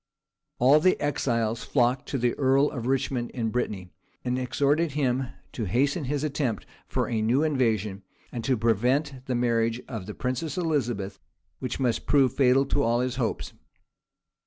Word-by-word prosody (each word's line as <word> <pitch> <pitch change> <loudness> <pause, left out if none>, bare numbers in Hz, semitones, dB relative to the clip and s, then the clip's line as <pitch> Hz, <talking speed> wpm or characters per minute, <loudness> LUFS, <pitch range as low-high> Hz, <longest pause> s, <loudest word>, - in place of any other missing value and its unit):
All 135 +5 +6
the 185 +4 +3
exiles 115 -5 0
flocked 125 +1 +1
to 140 - -1
the 120 -1 +1
earl 135 +1 +3
of 125 -5 -4
Richmond 130 -2 0
in 115 -3 -1
Brittany, 100 -7 -3 0.3
and 125 +1 0
exhorted 145 +4 +1
him 130 -3 0 0.2
to 115 - -3
hasten 140 - +1
his 145 +2 -1
attempt 140 -7 -1 0.2
for - - -1
a 110 -2 -1
new 120 +7 +2
invasion, 110 -9 0 0.3
and 120 - -5
to 130 -2 +2
prevent 125 +5 +1
the 130 - 0
marriage 115 -1 +1
of 110 -6 -6
the 105 - -6
princess 130 +5 -3
Elizabeth, 120 - -1 0.4
which 130 - -4
must 125 -3 0
prove 135 -4 +4
fatal 135 0 +4
to 140 - 0
all 120 -1 +2
his 125 0 -2
hopes. 120 -4 -2
125 Hz, 160 wpm, -26 LUFS, 115-140 Hz, 0.4 s, All